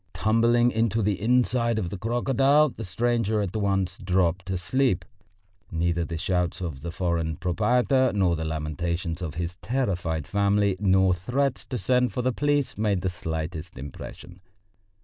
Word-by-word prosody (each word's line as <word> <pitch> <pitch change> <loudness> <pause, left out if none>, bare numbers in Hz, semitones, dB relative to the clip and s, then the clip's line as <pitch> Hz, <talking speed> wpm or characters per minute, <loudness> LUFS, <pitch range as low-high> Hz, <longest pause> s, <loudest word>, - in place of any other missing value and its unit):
Tumbling 120 +2 +3
into 115 -1 +1
the 100 -1 0
inside 120 0 +2
of 90 -5 -2
the 100 - -4
crocodile, 135 +6 +3
the 115 - -8
stranger 110 +2 0
at 100 -2 -2
once 100 -3 0
dropped 90 -1 0
asleep. 95 +2 0 0.6
Neither 85 0 0
the 85 - -4
shouts 90 0 -1
of 80 -7 -5
the 85 - -5
foreign 85 -2 -1
proprietor, 125 - +2
nor 95 -4 +2
the 80 - -3
lamentations 80 +3 -3
of 80 -3 -4
his 85 +1 -4
terrified 90 - -2
family, 100 -1 +2
nor 95 -2 +4
threats 125 +10 -1
to 130 - -4
send 125 -1 +2
for 125 - -2
the 130 0 +1
police 145 -4 0
made 105 -4 +1
the 95 - 0
slightest 80 -2 -5
impression. 75 +6 -9
95 Hz, 150 wpm, -26 LUFS, 85-120 Hz, 0.6 s, nor